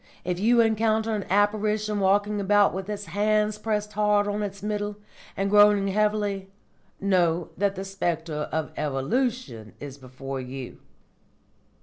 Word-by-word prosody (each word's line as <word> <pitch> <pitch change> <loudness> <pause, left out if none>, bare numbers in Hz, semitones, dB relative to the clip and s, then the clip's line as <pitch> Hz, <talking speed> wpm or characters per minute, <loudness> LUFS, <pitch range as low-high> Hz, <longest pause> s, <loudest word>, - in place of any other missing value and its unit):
If 180 0 -2
you 235 +3 +4
encounter 220 0 +1
an 205 -3 -2
apparition 210 +1 +1
walking 205 +2 +2
about 205 +1 +4
with 190 +1 -5
hands 210 +2 0
pressed 210 -1 -2
hard 210 -1 +2
on 205 +1 -2
its 200 -1 -5
Middle, 205 -1 -3 0.4
and 195 - 0
groaning 205 -1 +5
heavily, 205 -1 0 0.5
know 175 -4 +1
that 200 +1 0
the 190 +1 -5
spectre 165 -5 -3
of 160 0 -2
Evolution 150 - -2
is 140 -1 -9
before 135 +1 -7
you." 130 0 -8
205 Hz, 130 wpm, -25 LUFS, 175-210 Hz, 0.5 s, groaning